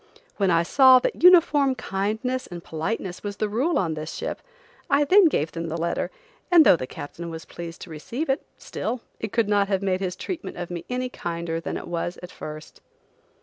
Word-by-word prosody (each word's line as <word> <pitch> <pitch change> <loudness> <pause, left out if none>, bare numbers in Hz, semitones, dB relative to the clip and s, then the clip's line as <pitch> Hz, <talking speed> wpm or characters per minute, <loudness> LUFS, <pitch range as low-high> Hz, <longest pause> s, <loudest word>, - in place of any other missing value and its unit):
When 195 -2 +2
I 170 -1 +4
saw 260 +7 +7
that 250 - -1
uniform 315 -6 +6
kindness 220 +6 -2
and 175 -1 -8
politeness 180 +3 -4
was 205 -1 -5
the 215 - 0
rule 255 +11 0
on 170 -4 0
this 155 +1 -6
ship, - - -4 0.5
I 280 +1 +4
then 380 +6 +6
gave 160 - 0
them 165 0 -4
the 165 +1 -3
letter, 170 +1 -1 0.4
and 340 -4 +7
though - - +8
the 130 -6 -5
captain 170 +6 -7
was 160 0 -7
pleased 170 0 -8
to 175 - -9
receive 235 - -4
it, 270 - +1 0.2
still, 235 +2 -4 0.2
it 220 - -4
could 230 -2 +1
not 205 -1 +2
have 195 -1 0
made 185 -1 +1
his 185 -2 -3
treatment 350 - -6
of 175 0 -5
me 170 -1 -5
any 250 0 -2
kinder 170 -6 -4
than 165 - -4
it - - -8
was 175 +1 -3
at 180 - -8
first. 155 0 -9
195 Hz, 205 wpm, -24 LUFS, 170-255 Hz, 0.5 s, though